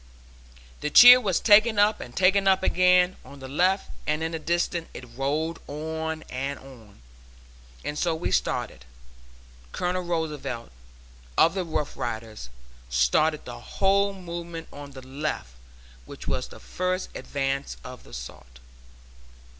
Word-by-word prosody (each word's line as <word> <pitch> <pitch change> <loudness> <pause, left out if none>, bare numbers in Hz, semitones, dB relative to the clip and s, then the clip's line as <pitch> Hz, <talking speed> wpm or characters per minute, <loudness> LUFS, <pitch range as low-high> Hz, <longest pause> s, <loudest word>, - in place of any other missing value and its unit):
"The 150 - -2
cheer 245 +9 +10
was 190 -7 +1
taken 215 +1 +5
up 205 +1 +3
and 120 - -10
taken 195 +1 +3
up 190 0 +4
again, 180 0 +4
on 140 - -13
the 135 - -8
left, 180 +8 +1 0.2
and 155 +1 0
in 165 - -2
the 165 - -4
distance 170 +1 -1
it 120 -2 -10
rolled 150 +5 -1
on 160 +1 -4
and 135 +2 -4
on. 115 - -15 0.8
And 150 0 -3
so 170 -2 +1
we 160 - -3
started. - - -1 0.9
Colonel 180 - -1
Roosevelt, 150 - -4 0.7
of 165 - +5
the 190 -1 -1
Rough 155 -3 -3
Riders, 110 - -5 0.4
started 65 - +2
the - - -8
whole 200 +1 +1
movement 170 -3 -7
on 145 -1 -10
the 130 -1 -11
left, 135 - -4 0.6
which - - -10
was - - -1
the - - -13
first 185 +1 -3
advance 140 0 -3
of 125 0 -10
the - - -17
assault." - - -10
160 Hz, 140 wpm, -26 LUFS, 135-180 Hz, 0.9 s, cheer